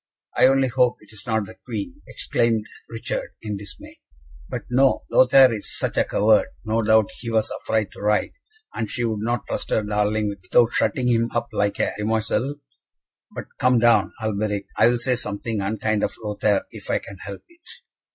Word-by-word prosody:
"I - - +6
only 135 0 +3
hope 125 0 +2
it 105 +1 -18
is 105 - -10
not 110 -2 0
the - - -11
Queen," 290 0 -6
exclaimed 115 -3 0 0.2
Richard, 115 0 -4
in 105 -2 -3
dismay. 100 0 -10 0.5
"But - - -4
no; 130 +2 +3
Lothaire 130 -1 +6
is 105 - -4
such - - -2
a - - +4
coward, 105 +1 +3 0.2
no 110 +1 +1
doubt 110 -1 +3
he 120 - -5
was 110 -1 0
afraid 110 -3 -1
to - - -12
ride, 105 +1 +1 0.4
and 110 -3 -3
she 120 - -3
would 110 -2 -1
not 120 0 -1
trust - - -4
her 110 - +1
darling 105 +1 0
without 100 +4 +2
shutting 125 -2 +1
him 115 -1 +2
up 120 - -1
like 100 0 0
a - - +1
demoiselle. 110 +6 0 0.8
But - - -7
come 125 0 +4
down, 115 -4 +4
Alberic; 105 -2 -2
I - - +5
will 120 - +1
say 125 +2 +1
nothing 105 +1 -3
unkind 110 +1 -1
of - - -1
Lothaire, 105 -1 0
if - - -10
I - - +2
can 100 - -9
help 100 +2 -8
it." 340 0 -18
110 Hz, 185 wpm, -23 LUFS, 105-120 Hz, 0.8 s, I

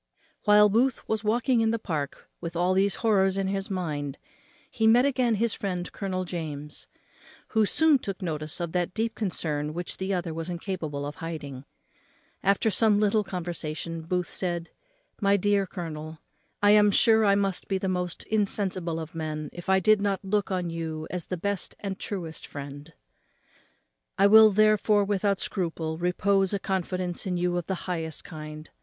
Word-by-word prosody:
While 210 0 +7
Booth 235 +5 +1
was 220 0 -1
walking 235 +3 +2
in 225 - +2
the 230 - +1
Park 155 -10 -4
with 170 0 -5
all 180 +2 +2
these 195 +1 +2
horrors 195 -3 +3
in 195 -1 0
his 195 0 -2
mind 150 -7 -3 0.5
he 225 - 0
again 250 +2 +4
met 210 - -1
his 230 -1 +2
friend 180 -3 -3
Colonel 185 -2 -3
James, 150 -4 -6 0.6
who 220 -2 +3
soon 315 +1 +4
took 195 -5 -5
notice 155 -2 -3
of 170 -2 -3
that 180 0 -1
deep 225 +1 0
concern 155 -8 -2
which 175 0 -2
the 190 +1 -3
other 175 -3 -1
was 165 +2 -5
incapable 170 -5 -4
of 145 +1 -6
hiding. 145 -5 -6 0.8
After 200 +3 +2
some 210 +1 +3
little 210 0 +3
conversation, 165 -3 -4
Booth 180 +2 -1
said, 175 -2 -3 0.5
"My 200 0 +4
dear 200 0 +2
colonel, 160 -3 -6 0.5
I 205 - +7
am 210 0 +6
sure 220 +2 +5
I 200 -1 +5
must 195 -2 0
be 195 - 0
the 190 - -3
most 180 -2 -2
insensible 190 -5 -1
of 160 0 -7
men 155 -2 -4
if 175 +1 -8
I 190 0 +5
did 215 +2 +4
not 200 -1 -1
look 205 0 0
on 180 -3 -2
you 160 -1 -4
as 180 -2 -3
the 185 - -3
best 200 +2 -3
and 200 -1 -3
the 190 - -15
truest 170 -6 -5
friend; 145 +2 -8 1.3
I 195 - +5
will, 220 +1 +9
therefore, 215 0 +4
without 200 0 +1
scruple, 165 -4 -2
repose 195 +2 +2
a - - -2
confidence 185 0 -2
in 180 -1 -1
you 175 0 0
of 175 -2 -2
the 190 - -1
highest 165 -3 -3
kind. 155 -1 -8
185 Hz, 175 wpm, -27 LUFS, 165-205 Hz, 1.3 s, will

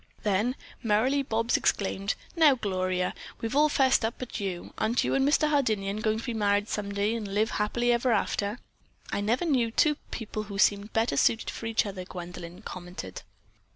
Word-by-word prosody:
Then 210 +5 +1 0.3
merrily 245 +5 +2
Bobs 230 -2 +1
exclaimed: 195 +1 0 0.2
"Now, 310 -5 +6
Gloria, 185 -4 -1 0.3
we've 225 +3 -3
all 300 +1 +5
'fessed 265 -4 +3
up 225 +2 -1
but 250 -2 -6
you. 190 -3 -4
Aren't 225 +3 +2
you - - 0
and 270 +1 +3
Mr. 305 +1 +3
Hardinian 215 -9 +1
going 215 0 0
to - - -7
be 240 - -2
married 205 -1 +1
some 205 -1 -3
day 200 +2 0
and 225 -3 -3
live 210 +3 0
happily 240 +3 +1
ever 240 +1 +2
after?" 205 0 0 0.5
"I - - -1
never 235 +10 +1
knew 255 -8 +2
two 300 +6 +3
people 215 -2 -4
who 200 - -5
seemed 205 +1 +2
better 225 -10 +1
suited 220 +9 +2
for 225 - -6
each 225 -1 +1
other," 195 -2 -5
Gwendolyn 175 +1 -8
commented. 175 - -7
215 Hz, 185 wpm, -28 LUFS, 200-240 Hz, 0.5 s, Now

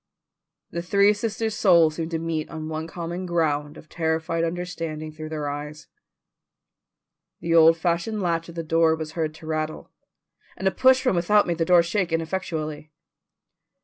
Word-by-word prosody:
The 170 - -3
three 200 +4 +4
sisters' 220 +1 -2
souls 170 -6 +5
seemed 160 +1 -4
to 165 - -2
meet 160 -1 -3
on 155 -1 -6
one 160 0 -4
common 175 +2 -5
ground 150 -4 -1
of - - -13
terrified 160 0 -1
understanding 165 -2 -4
though 155 0 -8
their 155 -2 -3
eyes. 150 +1 -6 1.5
The 170 0 -1
old 165 0 +7
fashioned 175 +6 -1
latch 170 -3 -1
of 170 - -11
the 165 - -3
door 165 0 +3
was 160 -1 -6
heard 155 -1 -3
to 160 - -13
rattle, 155 0 -4 0.7
and 190 - -1
a - - +3
push 260 +3 +4
from 255 -8 +2
without 205 +5 +3
made 170 -1 -2
the 165 - +2
door 175 0 +5
shake 175 0 -1
ineffectually. 160 -3 -3
165 Hz, 165 wpm, -24 LUFS, 155-175 Hz, 1.5 s, old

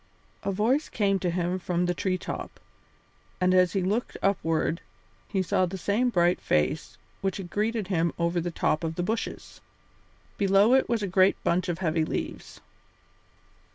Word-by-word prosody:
A 200 - -1
voice 235 +10 +1
came 195 -2 +1
to 180 - -1
him 175 +1 -1
from 180 0 -1
the 175 - +1
tree 185 +1 -1
top, - - -6 0.8
and 185 0 +3
as 180 -2 +4
he 195 - 0
looked 210 +6 -1
upward 165 -4 +1 0.5
he 190 -2 0
saw 185 +1 +1
the 190 +2 -5
same 210 +7 +1
bright 175 -4 +2
face 75 -1 0 0.2
which 195 0 -1
had 180 -3 -7
greeted 215 -1 -1
him 170 -3 +1
over 170 +1 0
the 175 - -2
top 160 -1 0
of 165 0 -2
the 175 - -2
bushes. 225 +4 -4 0.8
Below 200 +4 +5
it 265 -1 +3
was 230 -3 0
a - - 0
great 190 +1 +4
bunch 180 +2 +1
of 170 - -1
heavy 165 -3 0
leaves. - - -5
185 Hz, 170 wpm, -27 LUFS, 175-200 Hz, 0.8 s, Below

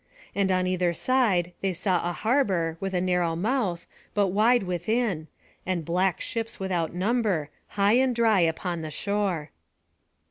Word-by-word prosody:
And 195 -1 +1
on 185 0 +2
either 180 -2 0
side 200 -10 +1
they 195 -1 0
saw 185 0 0
a 175 - -2
harbour, 190 - +1
with 195 -1 -3
a - - +2
narrow 180 -2 +1
mouth, 200 -2 -1 0.3
but 200 -2 +3
wide 220 +5 +3
within; 180 -1 -1 0.4
and 180 -4 -2
black 180 +2 +1
ships 225 -1 -4
without 180 -4 -1
number, 190 -6 0 0.3
high 205 +4 +4
and 260 -2 +2
dry 225 -4 +3
upon 170 +1 0
the 155 - -5
shore. 195 -3 -2
185 Hz, 150 wpm, -26 LUFS, 175-215 Hz, 0.4 s, high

